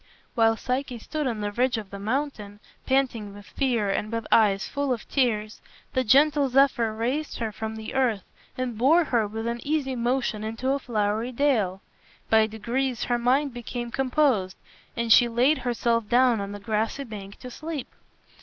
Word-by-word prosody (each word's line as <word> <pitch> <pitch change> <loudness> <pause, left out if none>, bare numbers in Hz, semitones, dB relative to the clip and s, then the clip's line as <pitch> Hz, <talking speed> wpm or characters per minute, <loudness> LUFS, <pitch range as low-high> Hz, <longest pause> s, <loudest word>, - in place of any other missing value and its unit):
While 225 -1 +3
Psyche 255 0 -3
stood 300 +5 -3
on 225 -4 -3
the 205 0 -2
ridge 245 +3 +1
of 210 -3 -7
the 200 - -7
mountain, 215 -3 -3 0.3
panting 240 -7 0
with 205 0 -12
fear 235 -7 0
and 210 +2 -2
with 230 0 -3
eyes 205 -3 +4
full 285 -1 -2
of 240 -3 -3
tears, 215 -5 0 0.3
the 260 - +1
gentle 280 +3 +4
Zephyr 255 -4 +3
raised 255 +7 -2
her 225 -2 -3
from 220 +1 -5
the 220 0 -7
earth 245 -7 +1 0.3
and 250 -4 -3
bore 315 +8 +5
her 235 -8 +1
with 220 +2 -5
an 235 0 -2
easy 285 -3 -1
motion 240 -3 -1
into 225 +4 -3
a 280 - +1
flowery 220 -1 -1
dale. 230 -9 +1 0.5
By 220 -1 +5
degrees 240 +3 -2
her 240 -1 0
mind 265 +3 +2
became 240 0 -5
composed, 255 - +1 0.4
and 235 -1 +4
she 240 - +6
laid 250 +6 +2
herself 235 -2 0
down 245 -3 +4
on 200 0 -5
the 205 - -7
grassy 220 +6 -2
bank 200 -5 -9
to 250 - -8
sleep. 310 0 -6
235 Hz, 175 wpm, -25 LUFS, 215-265 Hz, 0.5 s, she